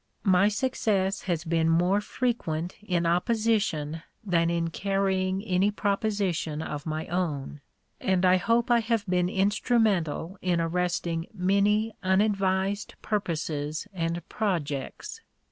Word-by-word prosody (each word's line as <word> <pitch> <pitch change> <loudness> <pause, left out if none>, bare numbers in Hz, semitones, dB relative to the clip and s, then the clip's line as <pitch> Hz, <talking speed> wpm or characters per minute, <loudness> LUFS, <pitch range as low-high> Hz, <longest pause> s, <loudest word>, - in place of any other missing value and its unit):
My 190 -1 +4
success 210 -4 0
has 170 -2 0
been 165 -1 +1
more 180 +5 +3
frequent 180 -9 -2
in 180 -5 0
opposition 180 -4 +1 0.2
than 170 -4 +2
in 170 -1 -1
carrying 190 0 0
any 190 -1 +2
proposition 200 -6 -1
of 150 0 -5
my 155 0 -2
own, 150 -5 -3 0.4
and 190 -1 +1
I 185 0 +6
hope 230 +6 +1
I 240 - +6
have 225 -2 0
been 180 -2 +1
instrumental 195 -4 +1
in 180 -2 +1
arresting 170 0 -1
many 205 +4 +2
unadvised 195 0 +1
purposes 160 -5 -2
and 170 -1 -3
projects. 160 -10 -3
185 Hz, 115 wpm, -27 LUFS, 165-205 Hz, 0.4 s, I